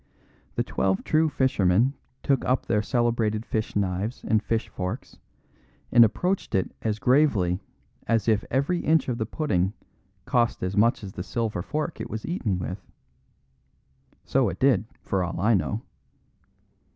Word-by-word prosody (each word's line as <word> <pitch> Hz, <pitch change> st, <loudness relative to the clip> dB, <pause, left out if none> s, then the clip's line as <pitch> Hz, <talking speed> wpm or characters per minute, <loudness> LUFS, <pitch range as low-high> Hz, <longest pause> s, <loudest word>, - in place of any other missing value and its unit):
The -, -, +1 dB
Twelve 95 Hz, 0 st, 0 dB
True 160 Hz, 0 st, +2 dB
Fishermen 125 Hz, -4 st, +2 dB, 0.3 s
took 135 Hz, -2 st, +2 dB
up 130 Hz, +1 st, +1 dB
their 105 Hz, -2 st, +1 dB
celebrated 115 Hz, -2 st, 0 dB
fish 110 Hz, -1 st, -2 dB
knives 100 Hz, +4 st, -1 dB
and 110 Hz, -2 st, +3 dB
fish 115 Hz, +1 st, -1 dB
forks, 90 Hz, 0 st, -6 dB, 0.7 s
and 120 Hz, -1 st, +8 dB
approached 180 Hz, -, 0 dB
it 95 Hz, -, 0 dB
as 110 Hz, -2 st, -1 dB
gravely 110 Hz, -7 st, +3 dB, 0.5 s
as 115 Hz, -2 st, +1 dB
if 110 Hz, -2 st, +3 dB
every 140 Hz, +7 st, +1 dB
inch 160 Hz, -3 st, +2 dB
of 120 Hz, -, -2 dB
the 110 Hz, -, -1 dB
pudding 100 Hz, -, 0 dB, 0.5 s
cost 120 Hz, -6 st, +1 dB
as 90 Hz, +1 st, -2 dB
much 115 Hz, +3 st, +3 dB
as 95 Hz, -1 st, -7 dB
the -, -, -5 dB
silver 110 Hz, -1 st, -2 dB
fork 155 Hz, -, -3 dB
it -, -, -5 dB
was 110 Hz, 0 st, -5 dB
eaten 120 Hz, -, -1 dB
with. 90 Hz, +1 st, -5 dB, 1.4 s
So 130 Hz, -5 st, +2 dB
it 90 Hz, -, -6 dB
did, 130 Hz, -6 st, +3 dB, 0.2 s
for 95 Hz, -2 st, 0 dB
all 90 Hz, -1 st, -4 dB
I 110 Hz, +4 st, +3 dB
know. 105 Hz, +3 st, 0 dB
110 Hz, 150 wpm, -26 LUFS, 95-130 Hz, 1.4 s, and